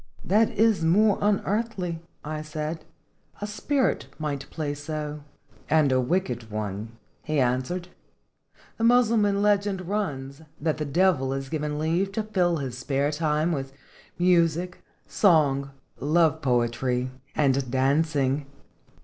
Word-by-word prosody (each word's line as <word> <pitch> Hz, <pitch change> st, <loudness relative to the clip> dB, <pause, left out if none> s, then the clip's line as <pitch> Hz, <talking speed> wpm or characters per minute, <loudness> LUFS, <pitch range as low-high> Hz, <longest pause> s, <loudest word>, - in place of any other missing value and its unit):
"That 215 Hz, +4 st, +4 dB
is 220 Hz, -5 st, +3 dB
more 200 Hz, +5 st, +4 dB
unearthly," 200 Hz, -4 st, 0 dB, 0.2 s
I 155 Hz, 0 st, -4 dB
said; 155 Hz, +1 st, -5 dB, 0.5 s
"a 205 Hz, -, -3 dB
spirit 260 Hz, +6 st, 0 dB
might 145 Hz, -3 st, -4 dB
play 150 Hz, -3 st, -3 dB
so." 150 Hz, 0 st, -5 dB, 0.5 s
"And 155 Hz, -3 st, +4 dB
a 130 Hz, 0 st, +3 dB
wicked 125 Hz, -6 st, -1 dB
one?" 105 Hz, +1 st, -4 dB, 0.3 s
he 155 Hz, -2 st, -1 dB
answered. 130 Hz, +9 st, 0 dB, 0.9 s
"The -, -, -1 dB
Mussulman 225 Hz, -4 st, +4 dB
legend 200 Hz, -3 st, +1 dB
runs, 145 Hz, -9 st, -3 dB, 0.2 s
that 155 Hz, 0 st, 0 dB
the 150 Hz, -, -1 dB
Devil 145 Hz, -3 st, +2 dB
is 135 Hz, 0 st, -4 dB
given 150 Hz, -1 st, -2 dB
leave 170 Hz, +6 st, 0 dB
to 220 Hz, -, -1 dB
fill 180 Hz, -5 st, +1 dB
his 130 Hz, -4 st, -5 dB
spare 140 Hz, +2 st, 0 dB
time 155 Hz, +1 st, 0 dB
with 135 Hz, -3 st, -3 dB, 0.4 s
music, 175 Hz, 0 st, +2 dB, 0.2 s
song, 145 Hz, -8 st, +3 dB, 0.3 s
love 160 Hz, +2 st, +2 dB
poetry, 125 Hz, 0 st, 0 dB, 0.2 s
and 135 Hz, -3 st, +2 dB
dancing." 140 Hz, +1 st, +1 dB
155 Hz, 125 wpm, -26 LUFS, 135-185 Hz, 0.9 s, That